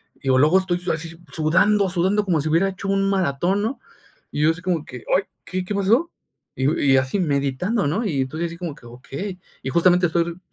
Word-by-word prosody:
digo, 130 -1 +1
luego 155 +7 +5
estoy 180 -2 -1
su 180 0 -2
así 165 +1 -5 0.2
sudando, 185 +6 +3
sudando 190 +4 +1
como 170 -6 +1
si 155 - -2
hubiera 175 +5 +3
hecho 195 +1 -7
un 195 0 +2
maratón, 185 +1 +1
¿no?, 230 +6 -2 0.5
y - - -2
yo 160 - +5
así 165 +2 -7
como 170 -4 -1
que, 125 -2 -9
ay, 190 - +2 0.2
¿qué 185 0 -3
qué 205 - -3
pasó?, 225 - +2 0.4
y - - -6
digo 145 +5 +2
y 135 -2 +4
así 130 +9 0
meditando, 145 - 0
¿no?, 190 +11 0
y 145 -9 0
entonces, 155 +6 -2
así 170 0 -9
como 170 -5 -5
que, 120 - -18
okey. 135 +11 -7 0.2
Y 135 - -2
justamente, 175 +3 +4
estoy 170 +1 +1
pe 170 +1 -7
170 Hz, 220 wpm, -22 LUFS, 150-195 Hz, 0.5 s, luego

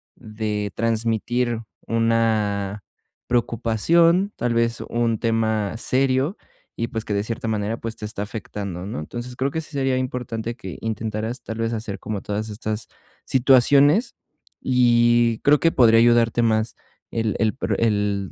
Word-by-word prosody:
de 105 -3 -4
transmitir, 115 +1 0 0.3
una 110 -3 0 0.4
preocupación, 160 - +2
tal 120 0 -1
vez 115 0 0
un 115 -1 0
tema 110 -3 0
serio 130 - +1 0.4
y, 115 - -2
pues, 110 -1 -4
que 105 - -2
de 100 0 0
cierta 115 +1 -4
manera, 110 0 -1
pues, 115 -1 -6
te 110 - -6
está 105 -1 -5
afectando, 100 -4 -6
¿no?, 100 -6 -5
entonces, 120 +10 -7
creo 135 +2 -1
que 160 +3 -2
sí 155 - -11
sería 135 -3 0
importante 120 -3 -3
que 95 -8 -8
intentaras, 110 +2 -3
tal 110 - -6
vez, 115 0 -1
hacer 110 -3 -4
como 105 -3 -4
todas 105 +1 -3
estas 105 0 -4 0.4
situaciones, 140 - +4 0.5
y 120 -2 +3
creo 145 +1 +4
que 165 - +3
podría 115 -5 +5
ayudarte 120 0 +4
más 110 -1 +1 0.4
el 115 -2 -1
el 110 -2 +2
pro - - -2
el 105 -3 0
115 Hz, 145 wpm, -22 LUFS, 110-120 Hz, 0.5 s, podría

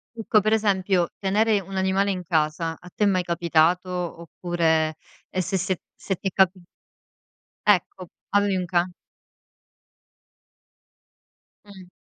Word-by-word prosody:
Ecco, 225 -1 +2
per 215 +2 0
esempio: 190 -4 +2
tenere 210 +2 +2
un 190 +1 -7
animale 190 +1 +1
in 185 -2 -4
casa, 160 0 0
a 180 - -14
te 210 - +1
è - - +4
mai 185 -2 +2
capitato? 170 +1 +2 0.3
Oppure 165 -2 0 0.3
e 185 - -1
se 190 - -2
se 185 0 -1 0.2
se 195 - -3
ti 195 - -2
capi 190 -1 +2 1.1
Ecco, 185 -2 +1 0.2
avevi 205 -1 +2
un 185 -1 -1
ca 175 0 0 2.7
Mh. 190 -3 -14
185 Hz, 125 wpm, -24 LUFS, 170-200 Hz, 2.7 s, è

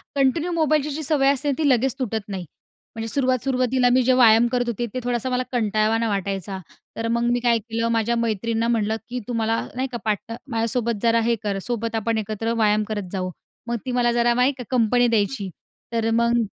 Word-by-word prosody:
Continue 290 +6 +1
मोबाईलची 310 -3 +1
जी 305 +2 -4
सवय 275 -2 +3
असते 285 +1 0
ती 310 -2 +1
लगेच 260 0 +2
तुटत 220 -4 -2
नाही. 190 -3 -5 0.5
म्हणजे 225 0 -4
सुरुवात 255 0 +1
सुरुवातीला 255 -1 +2
मी 255 - +4
जे 255 - +3
व्यायाम 235 -2 +6
करत 245 -1 0
होते 235 0 -2
ते 255 - -2
थोडासा 245 +1 -1
मला 250 0 0
कंटाळावाना 220 0 +1
वाटायचा. 195 -1 -3 0.4
तर 225 0 -2
मग 235 +1 0
मी 245 - +1
काय 235 -1 +3
केलं 230 +1 -3
माझ्या 230 +1 +1
मैत्रिणींना 230 0 -1
म्हणलं 220 -2 +1
की 250 - -3
तुम्हाला 225 -1 0 0.2
नाहीका 255 -1 -3
पाट 215 +1 -2 0.2
माझ्यासोबत 230 -2 -1
जरा 230 0 +4
हे 235 +1 +2
कर 200 -2 -1
सोबत 230 0 -3
आपण 225 +1 0
एकत्र 220 +2 -2
व्यायाम 215 -2 +2
करत 205 -4 -4
जाऊ. 185 -2 -2 0.4
मग 235 - -1
ती 255 - -2
मला 245 -1 +2
जरा 240 0 +2
नाही 250 +3 +3
का 250 - -6
कंपनी 245 0 +3
द्यायची. 205 -2 0 0.4
तर 225 0 +1
मग 235 +1 +2
235 Hz, 195 wpm, -23 LUFS, 220-250 Hz, 0.5 s, व्यायाम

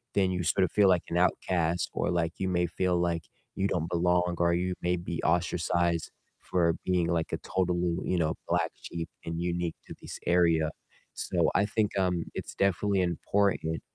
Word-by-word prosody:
then 95 -2 +3
you 90 -1 -1
sort 95 +3 +3
of - - -5
feel 100 -2 +5
like 90 -2 +3
an 85 - -1
outcast 85 -1 +1
or, - - 0
like, 85 -1 0
you 95 - 0
may 90 -1 +2
feel 90 +1 0
like 85 -2 0 0.3
you 95 - +1
don't 85 -1 -1
belong, 90 0 +2
or 85 0 +3
you 90 +1 0
may 90 +1 +1
be 85 -1 -4
ostracized 85 0 +1 0.3
for 85 -2 +1
being, 90 -2 +2
like, 85 -1 0
a - - +1
totally, 90 -2 0
you 90 - +2
know, 80 -2 +1
black - - +1
sheep 85 -1 -6 0.2
and 85 0 -3
unique 85 -1 -1
to - - -8
this - - -7
area. 85 -3 +3 0.4
So - - 0
I 100 +2 +4
think, 105 -3 0
um, 90 -3 +1
it's - - -6
definitely 100 0 +2
important 85 -1 0
85 Hz, 185 wpm, -29 LUFS, 85-90 Hz, 0.4 s, feel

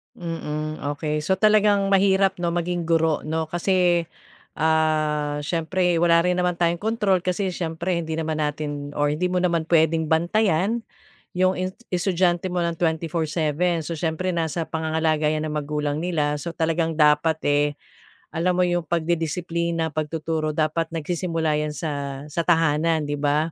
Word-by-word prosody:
Mm, 155 -3 -4 0.2
okey. 150 0 -2
So 170 +5 +1
talagang 205 -1 +3
mahirap 195 -1 +3
'no, 170 -1 -1
maging 175 -1 -2
guro 165 -2 +2
'no 160 0 -2
kasi 175 -1 +2 0.5
ah, 155 -2 +1
siyempre 175 +2 0
wala 170 -1 +5
rin 180 - +3
naman 180 -1 +1
tayong 170 0 +1
kontrol 210 -4 +1
kasi 185 +1 -1
siyempre 170 +1 -2
hindi 160 -1 -4
naman 160 -1 -2
natin 145 -1 -3
or 145 0 +2
hindi 175 +4 0
mo 180 - 0
naman 170 -3 0
pwedeng 160 -1 +3
bantayan 190 +5 +1 0.6
'yong 185 0 +3
i 185 0 -1 0.2
estudyante 175 -1 +1
mo 180 - -2
ng 170 0 0
24/7. 160 0 0
So, 170 - -3
siyempre 165 +3 -2
nasa 165 0 -1
pangangalaga 160 -1 0
'yan 155 0 -1
ng 155 - -4
magulang 150 0 -2
nila. 155 -4 0
So, 170 +2 -5
talagang 165 0 0
dapat, 150 +1 +4
eh, 145 0 +3 0.7
alam 170 +3 +2
mo 180 - +3
'yong 175 -1 0
pagdidisiplina, 170 0 -1
pagtuturo 155 0 -2
dapat 160 +1 0
nagsisimula 165 -1 -1
'yan 150 0 -2
sa 140 -4 -4
sa 170 +2 -1
tahanan 165 -1 +2
'di 145 - -1
ba? 150 +3 +1
165 Hz, 150 wpm, -23 LUFS, 155-175 Hz, 0.7 s, wala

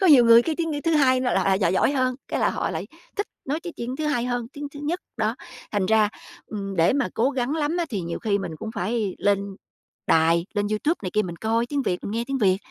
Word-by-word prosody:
Có 380 - +4
nhiều 280 -8 +8
người 230 0 +8
cái 320 +4 -1
tiếng, 330 -2 -1
ư, 290 - -2
thứ 330 - +2
hai 260 -4 +4
là 250 -1 +1
lại 190 - +2
lại 190 -1 +3
giỏi 185 -3 +2
giỏi 190 - +3
hơn, 255 -2 +1
cái - - -1
là - - +3
họ - - -2
lại - - -4 0.3
thích 410 - -1 0.2
nói 295 +4 -2
cái 345 - -7
tiếng 245 +2 -4
thứ 310 - -2
hai 245 -6 +1
hơn 245 -1 -2
tiếng 290 0 -6
thứ 285 - -7
nhất, 335 +5 -1 0.2
đó. 220 -1 0 0.4
Thành 205 -3 +1
ra, 220 0 +4 0.4
ừm, 195 -2 -5
để 165 0 +4
mà 275 -1 +1
cố 245 +4 +2
gắng 260 +1 -1
lắm 315 +1 0
á 345 - +1
thì 205 -5 -2
nhiều 170 -1 -4
khi 205 -3 0
mình 165 -5 -5
cũng 220 - -6
phải 210 0 -1
lên 200 -1 0 0.5
đài, 165 +2 +3
lên 205 0 +1
YouTube 215 +10 +1
này 185 - -3
kia 215 - +2
mình 175 -3 -6
coi 225 +4 0
tiếng 280 +2 -1
Việt, 180 -8 0
mình - - -3
nghe 230 +2 -1
tiếng 275 0 -1
Việt 190 -5 +4
230 Hz, 275 wpm, -24 LUFS, 200-285 Hz, 0.5 s, nhiều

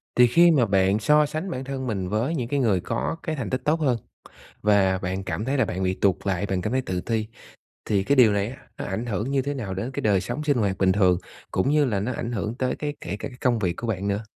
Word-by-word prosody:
Thì 125 0 +7
khi 170 +8 +6
mà 135 -7 +4
bạn 95 0 +2
so 150 +7 +4
sánh 155 +5 -4
bản 130 0 -4
thân 135 -1 -4
mình 95 -5 -2
với 115 - 0
những 120 -5 -2
cái 140 +3 0
người 105 -8 +2
có 90 - -2
cái 160 - -2
thành 125 -8 -4
tích 130 - -1
tốt 155 +2 +2
hơn 130 -6 +2 0.7
và 100 -3 +3
bạn 95 +1 -3
cảm 105 - -3
thấy 135 +3 0
là 130 - +3
bạn 95 +1 -3
bị 95 0 +1
tụt 95 -1 +2
lại, 95 0 0
bạn 95 -2 -1
cảm 110 - -2
thấy 130 0 +1
tự 90 -6 -3
ti, 110 +2 -1 0.6
thì 100 -2 +1
cái 140 - +2
điều 120 -6 +6
này 100 0 0
á 130 - -9 0.2
nó - - -5
ảnh 100 +5 -3
hưởng 115 +4 -2
như 135 - +2
thế 140 +2 -3
nào 110 -9 -4
đến 105 +7 -4
cái - - -4
đời 100 -3 +2
sống 120 +9 -4
sinh 145 -3 +2
hoạt 100 -4 0
bình 95 -1 +3
thường, 95 -2 +3 0.3
cũng 95 - +1
như 150 0 +4
là 105 -6 0
nó 115 +6 -2
ảnh 120 - -4
hưởng 110 +1 -3
tới 130 -1 -1
cái 145 -1 -3
kể 90 - -4
cả - - -4
cái 125 - -14
công 120 -3 +2
việc 90 -4 0
của 115 - -4
bạn 100 -2 -2
nữa? 100 +2 -1
110 Hz, 285 wpm, -25 LUFS, 95-130 Hz, 0.7 s, Thì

